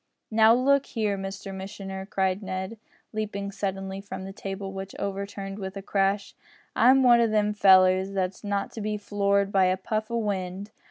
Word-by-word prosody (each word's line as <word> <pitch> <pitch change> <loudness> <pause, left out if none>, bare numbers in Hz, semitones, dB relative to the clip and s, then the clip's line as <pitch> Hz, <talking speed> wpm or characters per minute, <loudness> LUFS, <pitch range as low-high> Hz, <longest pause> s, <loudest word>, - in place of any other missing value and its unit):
"Now, 220 +1 +6
look 275 +2 +3
here, 215 -3 -1
Mr 195 0 -6
missioner," 190 0 -7
cried 190 0 0
Ned, 190 +2 -5 0.3
leaping 200 -2 -3
suddenly 195 -1 -4
from 195 -1 -7
the 195 0 -7
table, 195 0 -6
which 195 0 -7
overturned 200 0 -4
with 190 0 -6
a 195 - -7
crash, 195 0 0 0.4
"I'm 265 +2 +6
one 240 -1 +7
o' 230 - +4
them 210 -1 +1
fellers 190 -1 +5
that's 190 +1 -2
not 200 -1 -2
to 225 - -7
be 210 0 -2
floored 200 -1 +1
by 195 -2 +4
a 185 0 +2
puff 215 +3 -3
o' 235 - -1
wind. 200 -2 -3
200 Hz, 175 wpm, -26 LUFS, 195-210 Hz, 0.4 s, one